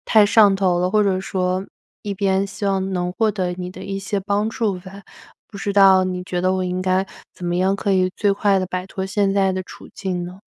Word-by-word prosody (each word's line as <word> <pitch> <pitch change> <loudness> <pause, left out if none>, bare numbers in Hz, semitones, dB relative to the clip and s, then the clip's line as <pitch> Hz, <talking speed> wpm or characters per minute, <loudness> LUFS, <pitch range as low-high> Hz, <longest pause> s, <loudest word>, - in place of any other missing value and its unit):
太 215 -2 +6
上 205 -2 +5
头 185 -3 +1
了， 180 +1 +1
或 215 0 +3
者 190 -1 +1
说 185 0 -2 0.4
一 205 -1 -4
边 195 0 +1
希 195 +1 -7
望 195 -1 0
能 180 0 -2
获 220 +1 +1
得 185 -3 -2
你 180 0 -6
的 185 +1 -10
一 195 0 -4
些 195 +1 -2
帮 205 +2 0
助 210 -5 -1
吧。 195 +2 -12 0.5
不 200 - -10
知 200 +1 -2
道 190 -2 +6
你 180 -1 -3
觉 180 -1 -3
得 185 +1 +1
我 185 - -1
应 180 0 -2
该 185 +1 +1 0.3
怎 180 - -9
么 175 0 0
样 190 +2 +2
可 200 -1 -1
以 185 -1 +2
最 205 -1 +2
快 200 -1 +2
地 185 - -1
摆 185 0 -4
脱 190 0 -5
现 195 0 +1
在 195 -1 +2
的 185 0 -3
处 - - -13
境 185 -3 -3
呢？ 180 +2 -10
190 Hz, 260 characters per minute, -21 LUFS, 185-200 Hz, 0.5 s, 太